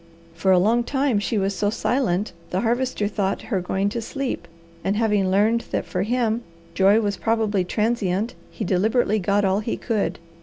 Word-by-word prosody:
For 165 +4 -1
a 185 - +6
long 225 +6 +3
time 265 -3 +1
she 210 +2 -1
was 195 0 +1
so 205 +1 +1
silent 215 -4 0 0.2
the 185 - -1
Harvester 240 -2 0
thought 200 -1 -1
her 190 - +1
going 190 +2 -1
to 230 +3 -3
sleep; 255 - -4 0.4
and 195 - 0
having 210 -3 +2
learned 215 +5 +2
that - - -2
for 180 - -2
him 230 +1 0 0.3
joy 195 +4 +5
was 205 -2 -1
probably 220 -4 +1
transient, 210 +1 0 0.2
he 215 - -5
deliberately 215 +4 +2
got 200 +2 +1
all 190 +1 +2
he 215 +2 -3
could. 220 -4 -1
210 Hz, 180 wpm, -23 LUFS, 195-230 Hz, 0.4 s, a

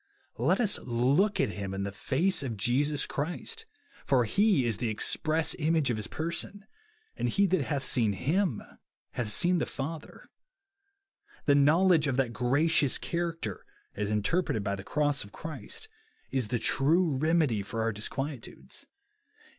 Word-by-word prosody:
Let - - +2
us 215 -5 +2
look 135 - +1
at 135 - +2
him 95 0 -5
in 100 - -3
the 100 - -3
face 150 - 0
of 120 -6 -4
Jesus 135 +7 +1
Christ; 310 - -5 0.4
for 125 -3 +2
He 195 - +3
is 115 -4 -1
the 115 - -1
express 155 +9 +1
image 155 -3 +2
of 115 - -2
his 110 0 -4
person, 170 - -2 0.5
and 120 - -1
he 200 +11 +3
that 185 -3 +1
hath 140 -3 -2
seen 110 -8 +1
Ilvni 160 - -1 0.3
hath 120 -3 -3
seen 175 - +2
the - - -1
Father, 155 +3 -7 1.2
The 145 - +5
knowled«:e 155 +2 +4
of 130 - -1
that 130 -3 +1
o'racious 140 +3 +2
character, 165 - -3 0.3
as 105 0 -3
interpreted 105 - 0
by 100 0 -1
the 100 - -8
cross 145 +3 0
of 100 - -14
Christ, 160 - -8 0.4
is 130 -5 -1
the 120 - -1
true 150 +7 +2
remedy 155 -6 +2
for 110 +3 -3
our 115 - +1
disquietudes. 135 +5 -5
140 Hz, 155 wpm, -29 LUFS, 115-165 Hz, 1.2 s, The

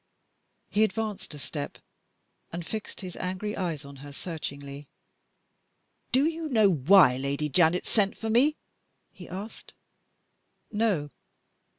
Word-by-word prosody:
He 210 - +4
advanced 220 -2 -2
a - - -8
step, 145 0 -5 0.7
and 170 0 -5
fixed 215 +4 -6
his 185 -2 -7
angry 185 +3 -3
eyes 165 -6 -2
on 140 0 -10
her 145 +2 -9
searchingly. 140 -3 -6 1.2
"Do 265 +3 +4
you 325 -1 -1
know 215 -6 +5
why 155 -3 +6
Lady 140 +3 -1
Janet 175 +4 +4
sent 200 -3 +2
for 225 0 -2
me?" 280 +7 +4 0.6
he 180 -4 -11
asked. 200 +5 -8 1.0
"No." 205 -10 +1
180 Hz, 120 wpm, -28 LUFS, 145-215 Hz, 1.2 s, why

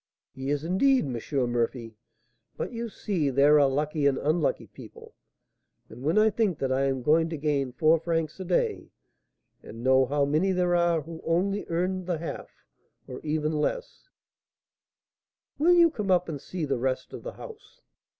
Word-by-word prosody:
"He 135 +1 -5
is, 145 0 -1
indeed, 250 - +2
M. 125 0 -2
Murphy. 115 -1 -2 0.6
But, - - -4
you 235 0 -4
see, 180 -8 -2
there 140 +3 +5
are 140 - +5
lucky 145 +1 0
and 135 - +1
unlucky 155 +1 0
people; - - -14 0.8
and 115 +3 -12
when 155 +8 0
I 215 +1 +5
think 205 -7 0
that 135 -1 -2
I 135 +1 +1
am 135 -2 -1
going 160 +4 +3
to 160 - -4
gain 140 -3 -1
four 155 +6 +3
francs 165 0 -2
a - - -4
day, 180 -1 -1 0.7
and 115 +2 -10
know 130 0 +4
how 145 +1 +1
many 155 +7 +1
there 180 -1 +1
are 170 -2 +2
who 165 +1 -9
only 195 +5 0
earn 180 +2 -2
the 175 -2 -1
half, 165 0 -6 0.6
or 125 - -7
even 155 0 -1
less - - -3 0.7
" - - -62
"Will 340 +4 +5
you 340 -2 +6
come 210 -9 -4
up 180 -1 +3
and 150 -4 -5
see 175 -1 -4
the 135 -4 -1
rest 130 +1 -2
of - - -7
the - - -7
house?" 460 +2 -13
155 Hz, 180 wpm, -27 LUFS, 140-185 Hz, 0.8 s, you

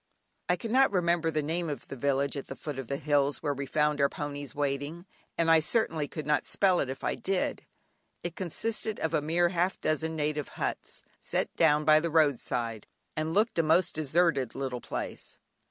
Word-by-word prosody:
I - - +4
cannot 255 +3 +3
remember 170 -3 +2
the 155 -1 -1
name 165 +2 -2
of 145 -5 -5
the - - -6
village 140 +2 0
at 140 - -5
the 135 - -6
foot 145 -2 -6
of 135 - -6
the 140 - -2
hills 145 0 +1
where 145 -2 +1
we 140 0 -5
found 150 +1 +1
our 140 - +4
ponies 145 -1 -6
waiting, 145 +4 -2 0.3
and 165 -1 +3
I 165 - +7
certainly 160 -4 +1
could 155 0 -6
not 150 0 +1
spell 185 -3 +3
it 135 - -1
if 130 - -6
I - - +1
did. 190 -1 -2 0.6
It 175 0 -4
consisted 215 +4 -1
of 160 0 -1
a 155 - +2
mere 170 +3 +2
half 180 +1 +1
a - - -34
dozen 160 +1 -1
native 150 -2 -1
huts, - - -3 0.2
set - - -2
down 150 +1 +4
by 155 0 +7
the 170 +2 -1
road 150 -5 +3
side, 115 -3 -3 0.3
and 155 +1 -2
looked 215 -3 +2
a - - +7
most 165 +3 +3
deserted 155 -4 +1
little 130 -3 -3
place. - - -5
155 Hz, 200 wpm, -29 LUFS, 140-170 Hz, 0.6 s, I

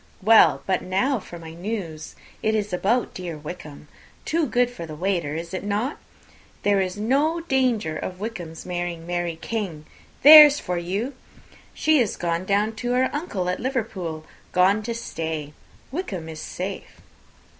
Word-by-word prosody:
Well, 225 +2 +6
but 185 -2 +1
now 245 +8 0
for 175 -2 -10
my 165 -1 -10
news: 175 -4 -5 0.3
it 220 0 +1
is 210 -3 -2
about 215 +7 +1
dear 175 -4 -6
Wickham; 150 -1 -9 0.4
too 325 -1 +1
good 245 0 +2
for 170 -9 -8
the 155 - -7
waiter, 170 -3 -1
is 170 +2 -6
not 205 +7 -1
it? - - -13 0.7
There 200 -1 +3
is 185 +1 -3
no 280 +10 +1
danger 250 - 0
of 185 0 -6
Wickham's 180 -7 -6
marrying 175 -2 -4
Mary 175 -1 -2
King 185 -10 -4 0.4
there's 295 0 +11
for 180 -1 -2
you! 200 +10 -3 0.6
She 315 -2 +3
is 230 -5 0
gone 170 +1 -1
down 205 +3 +1
to 245 +2 -1
her 255 +1 +2
uncle 245 - -3
at 180 - -1
Liverpool; 190 - -3 0.3
gone 190 +4 +4
to 230 +2 -4
stay. 160 -9 -4 0.4
Wickham 205 - -4
is 155 -1 -7
safe." 190 +2 -6
195 Hz, 155 wpm, -24 LUFS, 170-235 Hz, 0.7 s, there's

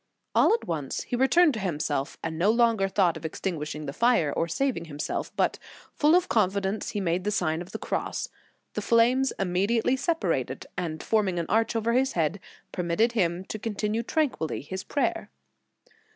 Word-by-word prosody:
All - - +5
at - - -6
once 150 -5 -3
he - - -3
returned 285 +6 +4
to 220 - -4
himself, 150 -5 -2
and 160 0 -3
no 190 +5 +3
longer 230 -3 +3
thought 185 -4 +2
of 160 - -11
extinguishing 155 -2 -4
the 140 - -5
fire, 230 -11 +2
or 165 - 0
saving 255 - -1
himself, 150 -1 -4
but, - - +1 0.3
full 305 +3 +4
of 365 0 +3
confidence, 200 -1 0
he 205 - -3
made 180 -1 0
the 205 - 0
Sign 170 -5 0
of 175 - -9
the - - -4
Cross. - - -3 0.4
The - - -2
flames 245 +3 +3
immediately 200 +7 +1
separated, 330 +5 -1
and 165 -3 -4
forming 205 -5 +1
an 170 - -1
arch 225 +2 +2
over 230 +1 +1
his 260 +2 +2
head, 165 +3 0 0.3
permitted 180 +6 +1
him 180 -5 0
to 215 - -6
continue 215 +1 -1
tranquilly 255 - -1
his 185 +6 -6
prayer. 285 - -1
195 Hz, 175 wpm, -27 LUFS, 170-235 Hz, 0.4 s, All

